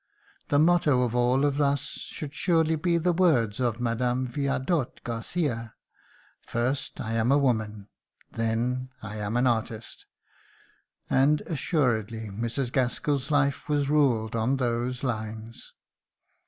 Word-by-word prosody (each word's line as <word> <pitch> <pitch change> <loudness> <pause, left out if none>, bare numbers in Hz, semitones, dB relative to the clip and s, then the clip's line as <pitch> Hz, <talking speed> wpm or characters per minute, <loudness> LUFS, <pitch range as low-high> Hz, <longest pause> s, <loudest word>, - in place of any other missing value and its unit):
The 145 - +2
motto 155 -5 +4
of 120 -2 -1
all 125 +3 +3
of 145 0 +1
us 140 -1 +2
should 145 -2 -6
surely 160 -2 +2
be 170 +2 +1
the 175 +2 +1
words 135 - +2
of 120 -2 0
Mme. 120 +2 0
Viardot 140 +2 -1
Garcia: 115 0 -3 0.7
"First 130 +4 -2
I 110 0 -3
am 115 +2 +2
a 140 - +5
woman... 110 -7 0 0.4
then 120 +3 -1
I 105 0 -6
am 105 +2 -2
an 125 - +2
artist." 115 -2 -2 1.0
And 145 +3 +3
assuredly 115 - -1
Mrs. 115 +5 -2
Gaskell's 130 +2 0
life 145 -2 +1
was 145 -1 +1
ruled 120 -8 +2
on 115 +4 +1
those 125 0 -1
lines. 110 -2 -5
125 Hz, 130 wpm, -27 LUFS, 115-145 Hz, 1.0 s, a